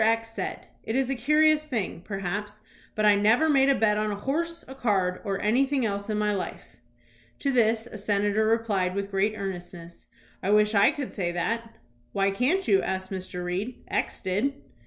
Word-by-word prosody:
X 225 +1 +2
said: - - -5 0.2
"It 220 - -4
is 265 0 +1
a - - 0
curious 305 +4 +3
thing, 220 - -3
perhaps, 205 +2 -4 0.3
but 215 - +1
I 210 - +7
never 220 +9 +4
made 275 -3 +4
a 275 - +5
bet 210 -3 +2
on 215 0 0
a 205 - -2
horse, 335 +10 -3
a 265 - -8
card, 195 -8 0
or 195 -3 -2
anything 265 +4 +2
else 200 0 -3
in 215 - 0
my 210 0 +1
life." 195 - -6 0.6
To 280 - 0
this 225 -2 +2
a 220 -3 -9
senator 205 +1 +1
replied 210 -5 +1
with 200 0 -3
great 200 +2 +1
earnestness: 175 -3 -7 0.3
"I 190 - -2
wish 210 +1 +4
I 200 -1 +6
could 285 -4 -4
say 175 -4 -1
that." 230 +6 -2 0.4
"Why 195 0 +2
can't 275 - +1
you?" 195 -2 +4
asked 190 0 -3
Mr. 185 -1 -4
Reed. 195 +8 -4
"X - - -2
did." 220 +9 -1
210 Hz, 190 wpm, -26 LUFS, 195-245 Hz, 0.6 s, I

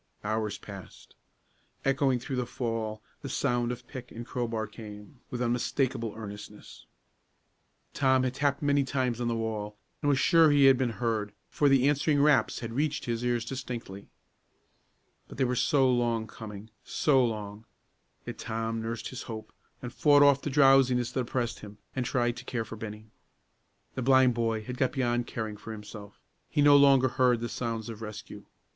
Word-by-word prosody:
Hours 110 0 -2
passed. 100 -2 -12 0.7
Echoing 135 -1 +2
through 125 +2 -5
the 125 -1 -1
fall, 110 -3 -3 0.2
the 140 - -6
sound 120 -3 0
of 125 0 -8
pick 130 -2 -9
and 115 +1 -7
crowbar 115 -3 -2
came, 105 +3 -11
with 125 0 -3
unmistakable 120 -1 -1
earnestness. 105 -1 -10 1.1
Tom 130 -1 +3
had 130 -1 -1
tapped 140 +1 0
many 140 -1 +3
times 130 -3 -1
on 120 - 0
the 115 - 0
wall, 105 -2 -4 0.2
and 145 - +1
was 140 - +3
sure 165 +3 +5
he 145 -1 +5
had 135 -1 +7
been 130 -1 0
heard, 110 -4 -1 0.2
for 145 - +2
the 135 -1 +4
answering 145 0 +2
raps 150 +1 +3
had 115 -1 -5
reached 145 +3 -1
his 120 0 -2
ears 120 -2 0
distinctly. 115 -6 -6 1.2
But - - -12
they 135 - +2
were 125 0 0
so 135 +2 +3
long 120 -3 +1
coming; 110 0 -10
so 135 -4 +2
long! 105 -2 -4 0.6
Yet - - -7
Tom 115 0 -3
nursed 115 0 -4
his 130 - -7
hope, 110 -1 -7 0.3
and 120 -1 -6
fought 145 +1 +5
off 140 -1 +5
the - - -3
drowsiness 135 -3 +4
that - - -2
oppressed 120 -1 -2
him, 105 -1 -11 0.2
and 125 -2 -1
tried 120 -1 0
to - - -8
care 115 -3 -3
for 115 - -8
Bennie. 110 0 -8 0.8
The 130 - -4
blind 130 0 +5
boy 115 -2 -1
had 125 +2 -6
got 130 - +1
beyond 120 -2 0
caring 110 -2 -5
for 110 - -9
himself. 105 -1 -10 0.3
He 145 - +2
no 145 0 +7
longer 140 -2 +6
heard 125 -1 +2
the 120 - -3
sounds 115 -2 -4
of 115 -2 -8
rescue. 110 -1 -8
120 Hz, 175 wpm, -28 LUFS, 110-130 Hz, 1.2 s, had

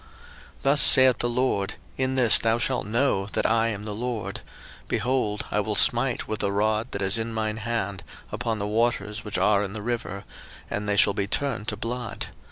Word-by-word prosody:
02:007:017 - - -23 0.6
Thus 140 +1 +5
saith 130 -1 +7
the 120 - 0
LORD, 120 -5 0 0.2
In 130 0 -1
this 120 -5 +5
thou 115 0 +1
shalt 125 -2 -1
know 110 -4 +1
that - - 0
I 115 +1 +2
am 105 -2 -4
the 105 - -3
LORD: 115 0 -4 0.5
behold, 125 -5 -1
I 105 - +1
will 105 0 -2
smite 120 +4 +3
with 110 -1 -3
the 100 - 0
rod 105 +2 0
that 100 - -3
is 95 +4 +2
in 115 +1 -3
mine 110 -1 -2
hand 100 -4 -3 0.3
upon 115 -2 -2
the 100 - -3
waters 105 -1 -1
which 105 - -4
are 100 -1 +3
in 100 -1 -5
the 105 -1 -6
river, 100 -5 -4 0.5
and 105 0 -3
they 100 - +1
shall 100 - +5
be 100 0 -2
turned 120 -2 -2
to 105 - -2
blood. 115 +1 -5
110 Hz, 200 wpm, -25 LUFS, 105-120 Hz, 0.6 s, saith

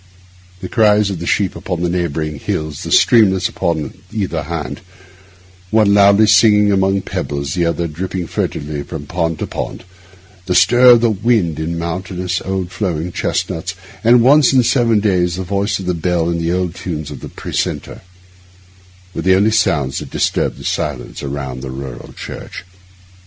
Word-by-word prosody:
The 90 - -4
cries 105 -2 +3
of 95 - -5
the 85 - -5
sheep 100 -3 0
upon 90 -3 -4
the - - +2
neighbouring 80 -4 -2
hills, 75 0 -3
the - - -6
streamlets 95 -6 +4
upon 80 -4 -2 0.2
either 95 -7 -2
hand, 75 -3 -5 0.9
one 110 -1 +3
loudly 100 +1 +6
singing 105 0 +5
among 95 0 +1
pebbles, 70 -1 -3
the 85 -2 +1
other 85 +1 -1
dripping 90 +3 -4
furtively 75 -2 -3
from 75 0 -7
pond 80 0 -2
to - - -3
pond, - - -6 0.6
the 90 - 0
stir 120 +8 +5
of 120 -2 +7
the 120 -1 +3
wind 100 -7 +1
in 85 +2 -3
mountainous 90 +1 -3
old 95 -1 -3
flowering 90 -5 -3
chestnuts, 90 +2 -2 0.3
and 120 +1 +5
once 140 +1 +5
in 130 -2 +5
seven 115 -3 +2
days 90 -4 +1
the 95 - -4
voice 100 +3 -1
of 95 - -7
the 90 - 0
bell 85 0 0
and 85 -1 -1
the 85 +1 0
old 90 -1 -1
tunes 80 -5 -5
of - - -8
the - - -8
precentor, - - -4 1.1
were - - -3
the 95 0 +4
only 105 +3 +3
sounds 75 -11 +1
that - - -8
disturbed - - -1
the - - -11
silence 70 -5 -3
around 70 -2 -5
the 65 0 -7
rural 65 -2 -8
church. - - -8
90 Hz, 170 wpm, -17 LUFS, 80-100 Hz, 1.1 s, of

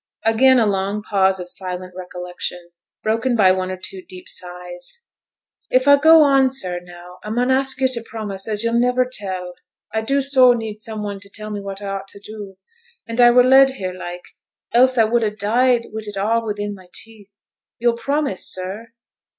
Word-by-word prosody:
Again 255 +4 +5
a 230 - +3
long 200 +1 -1
pause 190 -2 +1
of 180 - -7
silent 180 0 -2
recollection, 180 -1 -6 0.3
broken 230 +3 0
by 195 -4 +5
one 185 0 -1
or 185 - -4
two 185 +1 -8
deep 185 0 -12
sighs. 180 - -8 0.7
'If 255 +2 +2
I 285 - +8
go 320 +2 +7
on, 270 -2 +4
sir, 185 -9 -2
now, 175 0 -13
I 210 - -7
mun 245 +4 0
ask 265 0 +1
yo' 265 - +2
to 250 -3 0
promise 205 -3 -6
as 210 0 +2
yo'll 230 0 +1
niver 250 +1 +2
tell. 185 -4 -4 0.4
I 220 - 0
do 275 +5 0
so 260 -2 +5
need 220 -3 -5
some 215 -1 -6
one 200 -1 -5
to 200 0 -13
tell 215 +1 -7
me 205 -1 -4
what 195 0 -7
I 200 - -4
ought 195 0 -5
to 200 - -14
do, 205 -2 -10 0.5
and 230 +1 0
I 240 - +8
were 245 +1 +6
led 265 +1 +5
here, 185 -4 -4
like, 180 -1 -8 0.5
else 255 +2 +4
I 225 - +6
would 235 +2 +1
ha' 210 -1 -2
died 240 +3 +2
wi' 220 - -4
it 205 -1 -7
all 225 +4 +1
within 205 0 -3
my 185 -2 -14
teeth. 205 -2 -10 0.3
Yo'll 240 0 +2
promise, 280 -4 0
sir?' 200 +5 -5
210 Hz, 200 wpm, -20 LUFS, 190-245 Hz, 0.7 s, I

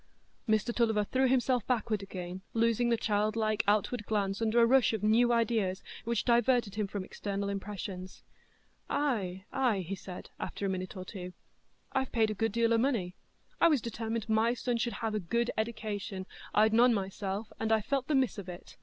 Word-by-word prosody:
Mr 220 +2 +2
Tulliver 220 -3 +2
threw 260 +5 +2
himself 250 -2 +2
backward 225 -4 0
again, 185 -1 -6
losing 230 +1 +2
the 235 - +3
childlike 215 0 +1
outward 210 +2 +2
glance 200 -1 0
under 225 +1 +3
a 230 - +7
rush 255 -1 +4
of 215 -2 -2
new 230 +3 +4
ideas, 220 -5 +1 0.2
which 235 -1 0
diverted 240 -3 +3
him 210 -1 -1
from 195 -1 -4
external 200 0 -3
impressions. 195 -2 -6 0.7
"Ay, 200 -10 -1
ay," 245 -7 +2
he 180 +2 -5
said, 185 -2 -8
after 200 - -4
a - - +1
minute 185 +1 -4
or 185 - -6
two, 180 -2 -7 0.6
"I've 265 -1 -1
paid 220 -2 +2
a 225 +2 0
deal 230 +1 +2
o' 230 - +4
money—I 230 - -1
was 300 -5 +4
determined 225 -1 -3
my 225 +2 +2
son 245 -1 -1
should 235 +1 -1
have 220 - -1
a 215 - 0
good 235 +6 0
eddication; 210 -3 -3 0.3
I'd 215 +1 +4
none 240 +1 +6
myself, 195 +1 -4
and 225 - -1
I've 220 -1 +3
felt 270 +1 -1
the 305 - +2
miss 260 -5 +1
of 190 -2 -7
it. 175 0 -10
220 Hz, 180 wpm, -31 LUFS, 200-235 Hz, 0.7 s, a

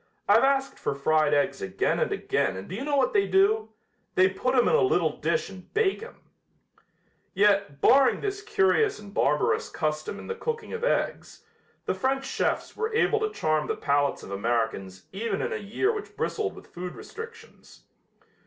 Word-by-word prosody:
"I've 210 +4 +5
asked 270 0 +1
for - - -2
fried 155 +2 +2
eggs 145 -2 +1
again 95 - 0
and - - 0
again 95 0 -1
and 95 - -8
do - - -8
you 225 +7 -4
know 290 0 0
what 265 -2 +2
they 200 -1 +3
do? 205 +3 +3 0.5
They 185 0 +6
put 255 +7 -1
'em 245 - +4
in - - +2
a 475 - +4
little 390 - +2
dish 480 - 0
and 185 -2 -12
bake 430 -2 +2
'em." 460 - -11 1.1
Yet, 195 -7 +2
barring 270 -1 +5
this 400 0 -3
curious 425 0 +2
and 205 -1 -12
barbarous 150 -4 +1
custom 155 +4 -3
in - - -9
the 465 - -3
cooking 460 0 -4
of 465 0 -5
eggs, - - -2 0.4
the - - 0
French 270 0 -1
chefs - - -2
were 445 0 -2
able 445 -1 +3
to 430 0 0
charm 155 - 0
the - - -1
palates 145 0 0
of - - -9
Americans 100 -3 -2
even 200 0 -2
in - - -2
a - - -2
year 225 - -1
which 425 -2 -7
bristled - - -2
with - - -15
food 180 +1 -6
restrictions. 455 +1 -11
210 Hz, 185 wpm, -26 LUFS, -, 1.1 s, They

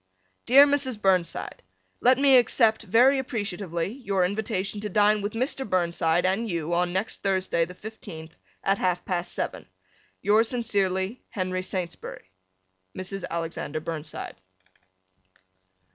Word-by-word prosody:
Dear 275 +4 +9
Mrs. 280 -5 +1
Burnside: 185 -4 0 0.4
Let 255 +1 +5
me 275 -1 +6
accept 225 -2 +3
very 240 +6 +4
appreciatively 200 - -3
your 200 -7 0
invitation 200 0 -2
to 210 0 -4
dine 210 0 +3
with 205 +1 -3
Mr. 255 +3 -1
Burnside 170 -2 +1
and 205 +5 0
you 170 -2 -2
on 175 0 +1
next 190 +4 -2
Thursday, 190 -3 +1
the 180 +2 -11
fifteenth, 165 -7 -10 0.3
at 195 0 +1
half 180 -1 0
past 175 -1 -2
seven. - - -4 0.6
Yours 220 +2 +4
sincerely, 200 -3 -1
Henry 185 -2 -2
Saintsbury. 180 - -6 0.7
Mrs. 190 0 -4
Alexander 165 -2 -3
Burnside. 155 -1 -6
195 Hz, 125 wpm, -26 LUFS, 175-225 Hz, 0.7 s, Dear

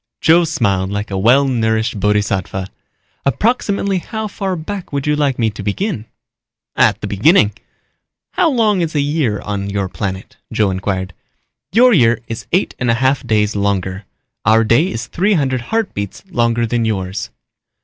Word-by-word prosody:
Joe 170 +1 +5
smiled 100 - 0
like 100 +1 -4
a 95 - -1
well 130 +7 +4
nourished 110 -3 0
bodhisattva. 100 -2 0 0.6
"Approximately 200 - 0
how 220 +4 -5
far 195 -2 -3
back 180 +3 -6
would 140 -1 -2
you 150 0 +2
like 145 -3 0
me 115 -2 +1
to 105 - -8
begin?" 115 - -2 0.7
"At - - +3
the - - -4
beginning." 105 - +4 0.8
"How 360 -3 +2
long 220 - +2
is 160 -2 -2
a - - +2
year 140 -7 0
on 100 -1 -3
your 100 -1 -1
planet?" 95 -1 -5
Joe 110 -3 +1
inquired. 95 -1 -3 0.6
"Your 245 +4 +5
year 120 - +4
is 115 - -6
eight 185 +4 +1
and 125 - 0
a 115 - +4
half 130 +3 +1
days 105 -2 +1
longer. 100 -1 -1 0.4
Our 110 +2 +4
day 115 - +3
is 115 -7 -4
three 190 - +1
hundred 130 -7 0
heartbeats 195 - -2
longer 120 -3 +1
than 115 +1 0
yours." 95 - -2
115 Hz, 160 wpm, -17 LUFS, 100-165 Hz, 0.8 s, Joe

